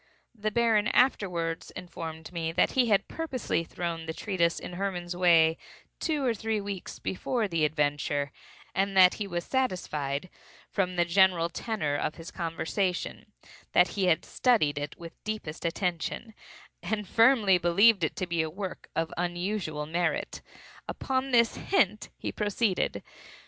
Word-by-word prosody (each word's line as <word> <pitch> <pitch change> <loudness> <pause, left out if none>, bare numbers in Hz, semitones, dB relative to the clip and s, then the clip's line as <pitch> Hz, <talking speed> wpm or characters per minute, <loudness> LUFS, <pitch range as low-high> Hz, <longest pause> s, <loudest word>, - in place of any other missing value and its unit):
The 215 -2 -2
Baron 220 -1 +3
afterwards 180 -11 +1
informed 160 -1 -7
me 165 -1 -2
that - - +3
he 255 -2 +3
had 205 -2 +3
purposely 265 - -2
thrown 165 -1 -4
the 160 - -4
treatise 170 -5 0
in - - -8
Hermann's 175 -2 -3
way 165 -3 +5 0.4
two 300 -5 0
or 240 - +2
three 220 0 -1
weeks 200 -2 -6
before 220 +4 -1
the 165 -4 +1
adventure, 145 -1 0 0.4
and 195 0 0
that 180 -1 +8
he 205 - -1
was 175 -2 -3
satisfied, 175 - -2 0.4
from 185 -2 0
the 175 -1 +3
general 175 -1 +4
tenor 170 -6 -2
of 155 - -2
his 165 +1 -9
conversation, 175 +2 -2 0.4
that - - +5
he 195 -2 -1
had 170 -2 +2
studied 180 - +2
it 145 0 -5
with 170 -1 -9
the - - -50
deepest 165 -7 -8
attention, 180 +6 -2 0.5
and 210 -2 -2
firmly 225 -4 +5
believed 190 +4 +5
it 155 - 0
to 185 - -2
be 170 -2 0
a 160 - -2
work 190 +3 -6
of 165 0 -1
unusual 175 -3 -2
merit. 175 +3 -1 0.5
Upon 265 0 -1
this 235 -2 +3
hint 215 - +1
he - - -4
proceeded. 205 -1 0
180 Hz, 150 wpm, -28 LUFS, 165-215 Hz, 0.5 s, that